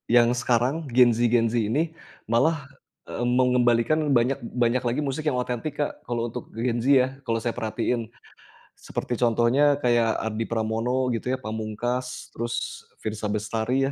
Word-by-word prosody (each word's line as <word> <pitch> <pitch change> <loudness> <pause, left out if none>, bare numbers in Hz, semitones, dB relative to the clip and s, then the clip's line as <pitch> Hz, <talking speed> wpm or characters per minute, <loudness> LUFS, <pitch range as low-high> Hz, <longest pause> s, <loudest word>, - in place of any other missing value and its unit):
yang 120 0 +6
sekarang 125 +6 +1
Gen 125 -1 +7
Z-Gen 115 0 +2
Z 120 - 0
ini 145 +10 0 0.4
malah 140 +4 +1 0.4
e - - -4
mengembalikan 125 +2 +3 0.2
banyak 125 +3 +1
banyak 120 +1 0
lagi 125 +5 0
musik 140 +3 -3
yang 150 - +2
otentik 125 +4 -3
Kak, - - -3
kalau 120 -1 -1
untuk 125 +1 -7
Gen 115 +1 -1
Z 120 - -4
ya 130 -2 +6 0.2
kalau 115 -1 0
saya 120 - 0
perhatiin. 115 0 -1 0.6
Seperti 125 - -5
contohnya 120 +5 +3
kayak 120 -2 +3
Ardi 110 0 -3
Pramono 115 +3 0
gitu 115 +2 -3
ya, - - -7
Pamungkas 120 +2 -4
terus 120 +1 -4 0.2
Firsa 110 0 -3
Bestari 110 +5 0
120 Hz, 150 wpm, -25 LUFS, 115-125 Hz, 0.6 s, Gen